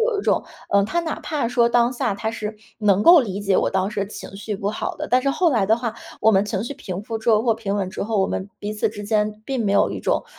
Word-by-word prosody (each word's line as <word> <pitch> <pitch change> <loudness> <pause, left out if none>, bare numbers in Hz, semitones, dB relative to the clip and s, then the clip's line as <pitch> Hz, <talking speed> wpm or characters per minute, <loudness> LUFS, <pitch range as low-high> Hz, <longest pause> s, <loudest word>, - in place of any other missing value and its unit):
有 455 -2 +1
一 - - -2
种， - - +1 0.2
呃， 200 0 +4
他 345 +11 -2
哪 325 -2 -4
怕 295 -6 -2
说 235 0 +3
当 240 +1 +3
下 240 -3 -1
他 215 +2 -3
是 215 -1 -5 0.2
能 205 -2 +3
够 340 -2 +9
理 200 -5 -3
解 200 -2 +2
我 - - +2
当 190 0 0
时 210 -1 -3
的 195 - -1
情 200 - -9
绪 210 0 -4
不 200 +1 -2
好 215 - -3
的。 - - -4
但 255 +1 +3
是 275 - +2
后 345 +4 +2
来 225 -8 +2
的 220 +3 +3
话 235 -2 -3 0.3
我 220 - +5
们 195 +1 +4
情 205 -1 -2
绪 280 +4 -5
平 185 -4 -6
复 225 - -3
之 225 +1 +1
后 215 - +5
或 230 -3 +2
平 205 -3 -3
稳 195 -2 -1
之 190 - -5
后， 215 0 -1
我 190 - +2
们 190 +1 -4
彼 210 +1 -4
此 210 - 0
之 205 0 -8
间 210 0 0
并 260 -4 -1
没 200 - +1
有 - - +3
一 - - -5
种， - - 0
215 Hz, 320 characters per minute, -22 LUFS, 200-240 Hz, 0.3 s, 够